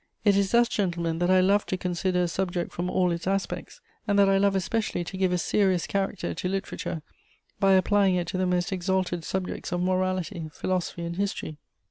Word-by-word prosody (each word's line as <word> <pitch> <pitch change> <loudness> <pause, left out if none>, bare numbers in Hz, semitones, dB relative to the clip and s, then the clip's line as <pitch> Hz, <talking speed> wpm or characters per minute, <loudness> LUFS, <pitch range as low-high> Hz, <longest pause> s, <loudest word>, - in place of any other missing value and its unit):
It 205 -1 +5
is 200 -1 +2
thus, 235 +2 +4
gentlemen, 170 -6 -1
that 175 0 +1
I 185 0 +5
love 200 +2 +3
to 185 - -1
consider 180 0 0
a - - +1
subject 175 0 -2
from 175 +1 -3
all 180 -1 +2
its 170 +1 -3
aspects, 195 - -3 0.3
and 205 -1 +2
that 200 -1 +6
I 195 0 +4
love 200 0 +3
especially 195 0 -1
to 180 - -7
give 185 -1 +1
a 180 - +2
serious 185 0 +1
character 195 -1 -2
to 180 - -3
literature 190 -4 -4 0.6
by 195 -1 +5
applying 190 0 +4
it 175 -1 0
to 185 - -2
the 185 - +1
most 180 +1 0
exalted 185 -2 -1
subjects 190 +1 -4
of 175 - 0
morality, 185 -2 -1
philosophy 180 -2 -2
and 170 +1 -4
history. 190 -6 -3
185 Hz, 200 wpm, -26 LUFS, 175-195 Hz, 0.6 s, that